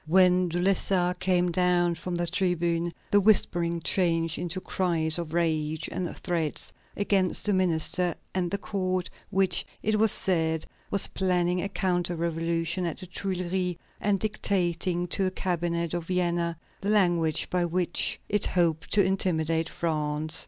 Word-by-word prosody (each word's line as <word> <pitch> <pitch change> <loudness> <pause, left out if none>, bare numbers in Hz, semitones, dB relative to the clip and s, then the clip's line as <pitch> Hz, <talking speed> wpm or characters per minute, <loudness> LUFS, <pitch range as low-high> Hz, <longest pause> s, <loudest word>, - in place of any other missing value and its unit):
When 180 +1 +4
De 175 +1 -2
Lessart 180 -1 +1
came 180 -1 +2
down 175 0 +2
from 175 +2 -5
the 175 0 -1
tribune, 175 -1 +1 0.2
the 205 - +5
whispering 175 -5 +2
changed 165 -2 +1
into 175 +1 -3
cries 170 -4 0
of 165 -3 -5
rage 160 -2 0
and 180 -2 -4
threats 165 -4 -3 0.2
against 195 -3 0
the 210 - +2
minister 180 -1 +1 0.2
and 180 -2 -1
the 200 - -1
court, 185 -3 -2 0.2
which, 190 0 +2 0.2
it 215 0 +1
was 220 -1 +6
said, 160 -3 +1 0.2
was 200 - +5
planning 180 -1 0
a 200 - -3
counter 175 -2 -1
revolution 165 +1 -1
at 165 - -4
the 185 - -8
Tuileries, 180 -1 -2 0.2
and 200 -1 +1
dictating 180 -4 -1
to 195 - +1
the - - +2
cabinet 170 -2 -2
of 170 -2 -3
Vienna 175 -2 0 0.2
the 200 - -2
language 175 -7 +2
by 180 -1 +1
which 175 0 +1
it 210 0 +2
hoped 165 -3 0
to 205 - +5
intimidate 165 -4 0
France. 155 0 -1
175 Hz, 150 wpm, -27 LUFS, 170-185 Hz, 0.2 s, was